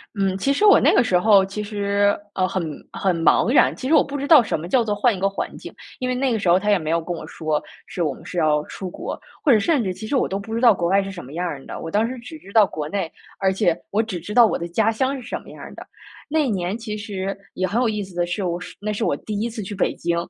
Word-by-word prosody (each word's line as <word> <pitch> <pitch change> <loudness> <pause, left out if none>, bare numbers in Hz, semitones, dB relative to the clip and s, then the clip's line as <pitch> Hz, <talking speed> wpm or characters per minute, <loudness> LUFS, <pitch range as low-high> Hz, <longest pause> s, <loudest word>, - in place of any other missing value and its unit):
嗯， 195 -2 0
其 275 +8 +1
实 285 - -1
我 410 - +8
那 - - +4
个 - - +5
时 185 -6 +2
候， 200 +1 +5
其 195 +2 -4
实， 205 -1 +1 0.2
呃， 185 -1 +1
很 190 - -2 0.3
很 185 -3 0
茫 210 - +4
然。 280 - +4
其 260 - -5
实 315 - +4
我 300 - +6
不 280 - -7
知 280 0 -3
道 305 -6 +8
什 205 - -2
么 165 - -6
叫 245 +3 +3
做 215 -2 -1
换 230 +2 +2
一 - - -7
个 195 - +2
环 195 - -4
境， - - -10 0.2
因 255 - -3
为 255 - 0
那 255 +1 0
个 225 - +1
时 200 - -3
候 175 +2 +5
他 210 +2 -2
也 205 - +5
没 155 -2 -3
有 165 0 +1
跟 175 +2 -4
我 - - -8
说 155 -2 -2 0.3
是 185 -3 -3
我 150 -4 0
们 - - -14
是 180 - -7
要 155 -2 +3
出 190 - -7
国， - - -6 0.2
或 295 - +4
者 225 - +6
甚 285 +2 +2
至 190 - -1
其 200 +4 -7
实 250 - -2
我 260 - +2
都 195 - -2
不 200 +3 -7
知 230 - -1
道 240 -2 +7
国 175 -4 0
外 195 +3 +3
是 195 - -5
什 180 -6 -9
么 135 - -11
样 175 +2 -3
儿 140 -5 -6
的。 - - -7
我 165 - -5
当 210 +5 +1
时 255 - -5
只 250 +7 -10
知 200 -10 -15
道 220 - +7
国 155 -6 -3
内， 185 -2 -3 0.3
而 190 -1 +2
且 190 -3 +2
我 215 +2 +1
只 205 -6 -5
知 205 +6 -7
道 240 -1 +8
我 220 - 0
的 170 - -3
家 220 +6 +1
乡 260 +5 0
是 245 - -11
什 - - -4
么 - - -15
样 - - -12
儿 - - -9
的。 - - -10 0.5
那 305 -1 +1
年 190 -2 -2
其 225 -2 -5
实 195 -2 -4 0.2
也 185 - 0
很 210 +6 0
有 245 - +2
意 210 -1 -2
思 190 -1 -12
的 175 - +1
是 185 +3 -3
我 175 -1 -2
是 - - -9
那 210 +1 -3
是 210 - -2
我 - - +1
第 210 -2 -5
一 230 +3 -1
次 225 -2 -6
去 195 - -6
北 195 - 0
京， 170 0 -1
200 Hz, 340 characters per minute, -22 LUFS, 180-230 Hz, 0.5 s, 我